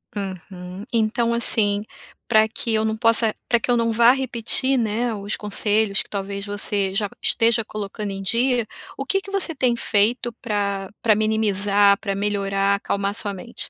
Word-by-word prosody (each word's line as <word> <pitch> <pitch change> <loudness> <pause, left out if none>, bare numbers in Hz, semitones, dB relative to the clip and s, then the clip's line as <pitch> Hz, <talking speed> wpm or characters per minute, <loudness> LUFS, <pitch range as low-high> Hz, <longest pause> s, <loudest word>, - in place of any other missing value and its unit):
Uhum. 185 -1 -7
Então, 235 0 0
assim, 210 -3 +4 0.4
pra 220 -2 +4
que 225 +1 -2
eu 220 0 +1
não 220 0 -2
possa 230 -1 +4
pra 235 - +2
que 230 - -7
eu 245 - +3
não 230 0 0
vá 235 +2 +5
repetir, 260 0 +3
né, 230 +1 -1
os 205 0 -4
conselhos 210 0 0
que - - -12
talvez 200 0 -5
você 205 -1 -2
já 205 0 0
esteja 230 0 +2
colocando 210 -1 -6
em 195 0 -6
dia, 240 +4 0 0.3
o 275 - -5
que 390 +5 -1
que 395 - -12
você 390 -4 +1
tem 255 -5 0
feito 235 +2 0
pra 200 -4 -3
pra 225 - +4
minimizar, 205 -2 +2
pra 200 -2 -4
melhorar, 200 -1 -1
acalmar 200 0 -3
a - - -8
sua 205 -1 0
mente? 215 +5 -4
215 Hz, 175 wpm, -21 LUFS, 200-235 Hz, 0.4 s, vá